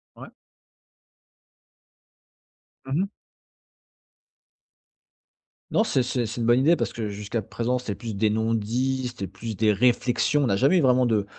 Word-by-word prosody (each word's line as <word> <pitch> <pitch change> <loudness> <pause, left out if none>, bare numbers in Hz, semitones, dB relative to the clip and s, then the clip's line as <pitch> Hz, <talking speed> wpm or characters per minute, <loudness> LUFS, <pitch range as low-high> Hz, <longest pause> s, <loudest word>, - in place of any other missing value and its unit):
Ouais. - - -11 2.6
Mmh 135 +5 -1
mh. 195 - -1 2.6
Non, - - +3
c'est 135 - +1
c'est 120 -1 -2
c'est 120 +2 -5
une - - 0
bonne 120 +1 +5
idée 155 +6 +4
parce - - -3
que 110 -2 -4
jusqu'à 105 +2 -4
présent, 120 +5 -2
c'est 105 -5 -5
plus 110 +1 -6
des 105 +2 +2
non-dits, 115 +4 -1
c'est 100 - -3
plus 110 +4 -7
des 110 -1 +3
réflexions. 125 +5 +2
On 130 - +1
a 100 - +2
jamais 135 - +3
eu - - +3
vraiment 130 -2 +4
de 105 -4 +1
120 Hz, 150 wpm, -25 LUFS, 110-130 Hz, 2.6 s, bonne